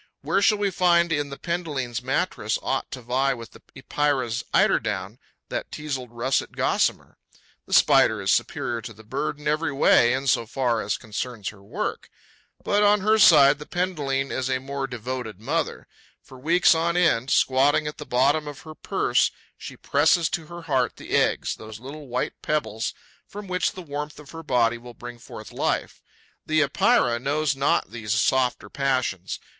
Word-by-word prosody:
Where 195 Hz, -, +1 dB
shall 210 Hz, +1 st, +4 dB
we 200 Hz, -1 st, 0 dB
find 170 Hz, -1 st, +3 dB
in 145 Hz, -2 st, 0 dB
the 140 Hz, -, -7 dB
Penduline's 150 Hz, -9 st, -3 dB
mattress 130 Hz, -, -1 dB
aught 135 Hz, -, -2 dB
to 125 Hz, -, -8 dB
vie 130 Hz, +3 st, +1 dB
with 115 Hz, -1 st, -10 dB
the -, -, -16 dB
Epeira's 130 Hz, -5 st, -1 dB
eiderdown, 105 Hz, +1 st, +1 dB, 0.3 s
that -, -, -4 dB
teazled 135 Hz, -4 st, -4 dB
russet 120 Hz, +3 st, -1 dB
gossamer? -, -, 0 dB, 0.5 s
The -, -, -6 dB
Spider -, -, +5 dB
is -, -, 0 dB
superior 115 Hz, -1 st, -1 dB
to 115 Hz, -, -8 dB
the 110 Hz, +1 st, -16 dB
bird 140 Hz, +6 st, -3 dB
in 150 Hz, -, -6 dB
every 155 Hz, 0 st, 0 dB
way, 125 Hz, -3 st, +4 dB
in 130 Hz, +1 st, -2 dB
so 115 Hz, -4 st, +2 dB
far 125 Hz, -2 st, 0 dB
as 105 Hz, -, -1 dB
concerns 115 Hz, -1 st, -5 dB
her 105 Hz, -2 st, -14 dB
work. 100 Hz, -, -4 dB, 0.5 s
But, 205 Hz, 0 st, +2 dB
on 205 Hz, 0 st, +4 dB
her 215 Hz, +2 st, +3 dB
side, 145 Hz, -7 st, +7 dB
the 150 Hz, -, -9 dB
Penduline 145 Hz, -7 st, -1 dB
is 130 Hz, 0 st, -2 dB
a 130 Hz, -, +1 dB
more 135 Hz, +1 st, -4 dB
devoted 125 Hz, -3 st, -5 dB
mother. 110 Hz, -, -2 dB, 0.4 s
For 130 Hz, -, -14 dB
weeks 170 Hz, +7 st, +4 dB
on 170 Hz, +1 st, 0 dB
end, 135 Hz, -8 st, +2 dB
squatting 140 Hz, +4 st, +3 dB
at 150 Hz, +1 st, -6 dB
the -, -, -5 dB
bottom 140 Hz, +5 st, +2 dB
of 145 Hz, -2 st, -8 dB
her 155 Hz, -, -10 dB
purse, -, -, +1 dB, 0.3 s
she -, -, -10 dB
presses 160 Hz, +3 st, +2 dB
to 165 Hz, -3 st, -3 dB
her 175 Hz, +1 st, -9 dB
heart 130 Hz, -6 st, 0 dB
the -, -, -11 dB
eggs, -, -, +1 dB
those 110 Hz, 0 st, -10 dB
little 140 Hz, +4 st, -9 dB
white 125 Hz, +1 st, -2 dB
pebbles 115 Hz, -8 st, -2 dB, 0.3 s
from 205 Hz, 0 st, -9 dB
which 180 Hz, -1 st, 0 dB
the 185 Hz, -, -8 dB
warmth 150 Hz, -1 st, -6 dB
of 150 Hz, -, -13 dB
her 165 Hz, -, -8 dB
body 120 Hz, -5 st, +1 dB
will 120 Hz, 0 st, -12 dB
bring 120 Hz, 0 st, -9 dB
forth -, -, -10 dB
life. -, -, -2 dB, 0.4 s
The 155 Hz, 0 st, +2 dB
Epeira 120 Hz, -3 st, +2 dB
knows 145 Hz, +2 st, 0 dB
not 135 Hz, -7 st, +1 dB
these 110 Hz, -2 st, -2 dB
softer 125 Hz, 0 st, +1 dB
passions. 130 Hz, -8 st, -2 dB
135 Hz, 175 wpm, -24 LUFS, 120-155 Hz, 0.5 s, side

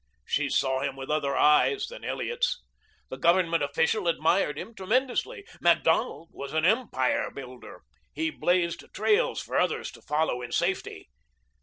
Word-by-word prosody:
She 145 Hz, 0 st, 0 dB
saw 135 Hz, 0 st, +1 dB
him 135 Hz, 0 st, -2 dB
with 135 Hz, +1 st, -6 dB
other 145 Hz, -2 st, 0 dB
eyes 150 Hz, -, +4 dB
than 485 Hz, +4 st, -10 dB
Elliot's. -, -, -2 dB, 0.5 s
The -, -, -7 dB
Government 170 Hz, -1 st, +3 dB
official 160 Hz, +7 st, 0 dB
admired 165 Hz, -1 st, +1 dB
him 230 Hz, -, -7 dB
tremendously. 245 Hz, -, -1 dB, 0.2 s
Macdonald 165 Hz, -, +2 dB
was 140 Hz, +1 st, -8 dB
an 160 Hz, 0 st, +1 dB
empire 210 Hz, -, +1 dB
builder. 130 Hz, -2 st, -11 dB, 0.3 s
He 320 Hz, 0 st, -2 dB
blazed 175 Hz, -, 0 dB
trails 440 Hz, +3 st, +1 dB
for -, -, -3 dB
others -, -, -1 dB
to -, -, -15 dB
follow 150 Hz, -4 st, -1 dB
in 120 Hz, -, -7 dB
safety. -, -, -2 dB
165 Hz, 145 wpm, -27 LUFS, 140-225 Hz, 0.5 s, eyes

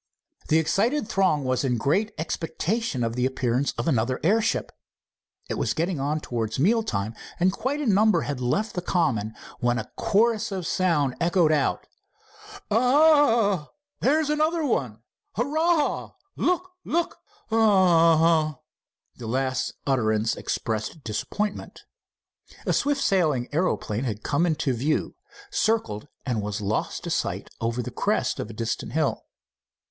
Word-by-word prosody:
The 155 Hz, -, +4 dB
excited 215 Hz, -, +1 dB
throng 185 Hz, -9 st, +2 dB
was 130 Hz, 0 st, 0 dB
in 125 Hz, -3 st, +1 dB
great 190 Hz, -, +1 dB
expectation 165 Hz, -, -2 dB
of 115 Hz, 0 st, -2 dB
the 125 Hz, +1 st, +2 dB
appearance 130 Hz, +1 st, 0 dB
of -, -, -2 dB
another 125 Hz, -3 st, +1 dB
airship. 220 Hz, +6 st, +1 dB, 0.8 s
It -, -, -3 dB
was -, -, 0 dB
getting 170 Hz, -1 st, -1 dB
on 150 Hz, +3 st, -1 dB
towards 110 Hz, -4 st, -3 dB
meal 220 Hz, -, +3 dB
time, 105 Hz, -, -3 dB, 0.3 s
and 185 Hz, +2 st, +4 dB
quite 260 Hz, +9 st, -2 dB
a 295 Hz, -, -2 dB
number 215 Hz, 0 st, +4 dB
had 140 Hz, -3 st, -4 dB
left 205 Hz, -, 0 dB
the 180 Hz, -, -2 dB
common, 125 Hz, -, 0 dB, 0.2 s
when 120 Hz, 0 st, +1 dB
a -, -, -5 dB
chorus 225 Hz, +1 st, +2 dB
of 190 Hz, -3 st, -3 dB
sound 155 Hz, -8 st, +1 dB
echoed 170 Hz, -1 st, +3 dB
out: 150 Hz, -3 st, +1 dB, 0.9 s
"A—ah!" 240 Hz, -, +4 dB, 0.3 s
"There's 300 Hz, +2 st, +2 dB
another 310 Hz, +2 st, +1 dB
one." 120 Hz, -, -1 dB, 0.3 s
"Hurrah—look! 335 Hz, -, 0 dB
look!" 340 Hz, +1 st, -1 dB, 0.3 s
"A—a—ah!" 165 Hz, -7 st, +4 dB, 0.6 s
The 115 Hz, -, -7 dB
last 130 Hz, +1 st, -1 dB
utterance 110 Hz, -5 st, +1 dB
expressed 110 Hz, +7 st, -3 dB
disappointment. 200 Hz, -, -4 dB, 0.8 s
A -, -, +1 dB
swift 285 Hz, 0 st, +1 dB
sailing 155 Hz, -10 st, +1 dB
aeroplane 135 Hz, -, 0 dB
had 110 Hz, -3 st, -4 dB
come 165 Hz, +5 st, +1 dB
into 155 Hz, -4 st, 0 dB
view, 140 Hz, +6 st, -1 dB, 0.4 s
circled, 220 Hz, -, 0 dB, 0.2 s
and 120 Hz, -5 st, -1 dB
was 105 Hz, +1 st, -3 dB
lost 105 Hz, +1 st, -2 dB
to -, -, -4 dB
sight -, -, -2 dB
over 115 Hz, +2 st, -1 dB
the -, -, -6 dB
crest -, -, 0 dB
of 105 Hz, -, -4 dB
a -, -, -8 dB
distant 115 Hz, +1 st, -3 dB
hill. -, -, 0 dB
165 Hz, 135 wpm, -25 LUFS, -, 0.9 s, The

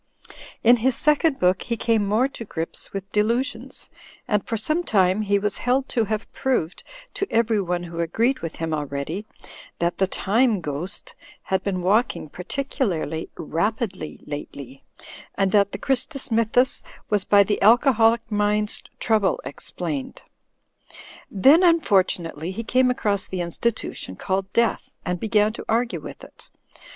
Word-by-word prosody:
'' -, -, -16 dB
In 240 Hz, +2 st, +7 dB
his 250 Hz, +2 st, +1 dB
second 300 Hz, +1 st, +3 dB
book 180 Hz, 0 st, +2 dB
he 235 Hz, -1 st, -3 dB
came 225 Hz, -2 st, +1 dB
more 220 Hz, +6 st, +2 dB
to 270 Hz, -4 st, -9 dB
grips 165 Hz, -6 st, -5 dB
with 195 Hz, 0 st, -6 dB
delusions, 235 Hz, +7 st, -1 dB, 0.4 s
and 210 Hz, -2 st, +1 dB
for 225 Hz, -, -3 dB
some 310 Hz, +11 st, 0 dB
time 190 Hz, -, +2 dB
he 200 Hz, -1 st, +2 dB
was 205 Hz, 0 st, -1 dB
held 255 Hz, +2 st, +1 dB
to 230 Hz, -2 st, +1 dB
have 215 Hz, +1 st, -2 dB
proved 220 Hz, -10 st, -1 dB, 0.3 s
(to 400 Hz, -, -2 dB
everyone 205 Hz, -6 st, +1 dB
who 170 Hz, -1 st, -7 dB
agreed 230 Hz, +10 st, +1 dB
with 165 Hz, -1 st, -6 dB
him 165 Hz, -1 st, -3 dB
already) 150 Hz, +7 st, -4 dB, 0.5 s
that 170 Hz, 0 st, -1 dB
the 190 Hz, -, +3 dB
Time 220 Hz, +3 st, +2 dB
Ghost 175 Hz, -, -5 dB, 0.3 s
had 190 Hz, -1 st, 0 dB
been 185 Hz, -3 st, -2 dB
walking 200 Hz, -4 st, +1 dB
particularly 180 Hz, -, -3 dB
"rapidly, 190 Hz, +1 st, -2 dB
lately; 140 Hz, -2 st, -8 dB, 0.5 s
and 195 Hz, -1 st, +1 dB
that 200 Hz, -1 st, +3 dB
the -, -, -4 dB
Christus 270 Hz, +1 st, -1 dB
Msrthus 230 Hz, +3 st, +2 dB, 0.3 s
was 205 Hz, -2 st, +2 dB
by 200 Hz, +1 st, +5 dB
the 205 Hz, +1 st, -1 dB
aJcoholic 230 Hz, 0 st, +4 dB
mind's 210 Hz, 0 st, +1 dB, 0.2 s
trouble 215 Hz, -4 st, +2 dB
explained." 145 Hz, +1 st, -4 dB, 1.1 s
Then, 275 Hz, -, +5 dB
unfortunately, 190 Hz, -, +2 dB
he 195 Hz, +5 st, -4 dB
came 255 Hz, +2 st, +3 dB
across 205 Hz, -5 st, 0 dB
the 185 Hz, -1 st, -3 dB
institution 175 Hz, -, -3 dB
called 190 Hz, -, -2 dB
Death, 235 Hz, 0 st, +1 dB, 0.2 s
and 180 Hz, +1 st, -2 dB
began 215 Hz, 0 st, +2 dB
to -, -, -8 dB
argue 235 Hz, +2 st, +1 dB
with -, -, -10 dB
it. -, -, -16 dB
210 Hz, 145 wpm, -23 LUFS, 180-235 Hz, 1.1 s, In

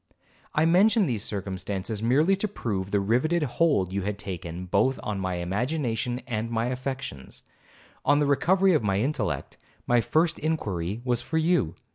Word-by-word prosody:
I 155 Hz, -, +4 dB
mention 200 Hz, +5 st, +4 dB
these 115 Hz, -, -1 dB
circumstances, 100 Hz, +1 st, -3 dB
merely 145 Hz, +11 st, +3 dB
to 215 Hz, -, -1 dB
prove 100 Hz, -, -3 dB
the 100 Hz, -, +2 dB
rivetted 125 Hz, +12 st, +1 dB
hold 120 Hz, -, +1 dB
you 100 Hz, -, 0 dB
had 100 Hz, +1 st, -3 dB
taken 90 Hz, -3 st, -6 dB
both 110 Hz, +9 st, +1 dB
on 105 Hz, -2 st, -3 dB
my 95 Hz, -1 st, -2 dB
imagination 120 Hz, -, -2 dB
and 115 Hz, -2 st, -3 dB
my 115 Hz, +1 st, 0 dB
affections. 130 Hz, -, -5 dB, 0.6 s
On 145 Hz, +1 st, +4 dB
the 145 Hz, -, +2 dB
recovery 185 Hz, +7 st, +3 dB
of 155 Hz, -, +3 dB
my 100 Hz, -2 st, +1 dB
intellect, 140 Hz, +7 st, -2 dB, 0.3 s
my 120 Hz, -1 st, +3 dB
first 160 Hz, +6 st, +1 dB
inquiry 105 Hz, -, -2 dB
was 120 Hz, -1 st, +1 dB
for 160 Hz, -, -2 dB
you. 160 Hz, -, +2 dB
120 Hz, 160 wpm, -26 LUFS, 100-155 Hz, 0.6 s, I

